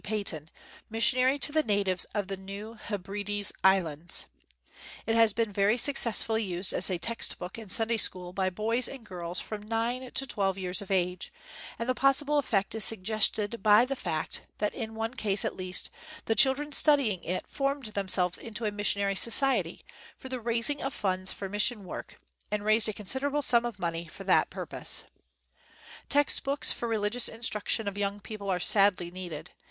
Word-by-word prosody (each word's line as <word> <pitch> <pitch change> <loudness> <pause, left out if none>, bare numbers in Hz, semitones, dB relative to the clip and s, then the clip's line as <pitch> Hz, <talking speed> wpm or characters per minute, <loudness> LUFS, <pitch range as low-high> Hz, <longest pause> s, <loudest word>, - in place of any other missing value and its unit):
Paton, 190 -8 -3 0.4
missionary 255 +4 +3
to 290 - +4
the 310 +1 +2
natives 200 -6 0
of 205 -2 -1
the 195 - -4
New 200 +3 -9
Heb 205 -4 -7
rides 205 0 -2
Islands. 175 -4 +2 0.8
It 225 - 0
has 225 -1 +5
been 225 -1 -2
very 200 +4 +2
success 250 -4 +5
fully 220 0 -1
used 185 -1 -1
as - - +1
a 185 - -1
text 230 +6 -1
book 180 +5 -7
in 220 -3 -11
Sunday 225 +3 +2
school 180 -4 +1
by 190 0 0
boys 225 +6 -1
and 265 -4 -10
girls 175 -3 -3
from 215 -1 -6
nine 230 +4 -2
to 270 - -1
twelve 195 -6 -1
years 185 0 0
of 200 - -10
age, 180 -1 -1 0.5
and 230 - -4
the 255 - +2
possible 275 +3 +2
effect 200 -8 -1
is 220 -1 +2
suggested 215 +2 +1
by 215 +2 +6
the 275 +1 -3
fact 155 -11 -4 0.2
that, 210 - -1
in 225 -3 -6
one 225 +2 -3
case 205 -5 0
at - - -3
least, 185 -1 -3 0.3
the 225 - +1
chil 265 +5 +6
dren 295 +2 -6
studying 275 - +4
it 180 +2 -3
formed 275 -1 -2
themselves 185 -3 +2
into 225 0 -6
a 210 - 0
missionary 200 -1 0
society, 230 -5 +3 0.3
for 260 - -10
the 255 -2 -4
raising 235 +5 +1
of 270 - -4
funds 185 -1 -2
for 195 - -6
mission 210 +1 0
work, - - -9 0.3
and 210 0 -3
raised 215 +1 +4
a - - -3
considerable 270 +8 -1
sum 240 -2 +4
of 235 -5 -8
money 170 -2 -4
for - - -11
that - - +3
purpose. - - -3 1.1
Text 290 0 +3
books 275 +1 +2
for 235 - -3
religious 225 +2 0
instruction 225 -1 -1
of 200 0 -4
young 200 0 -2
people 205 -1 -7
are 180 -1 0
sadly 185 -2 +2
needed. 175 -3 -8
210 Hz, 185 wpm, -28 LUFS, 190-235 Hz, 1.1 s, by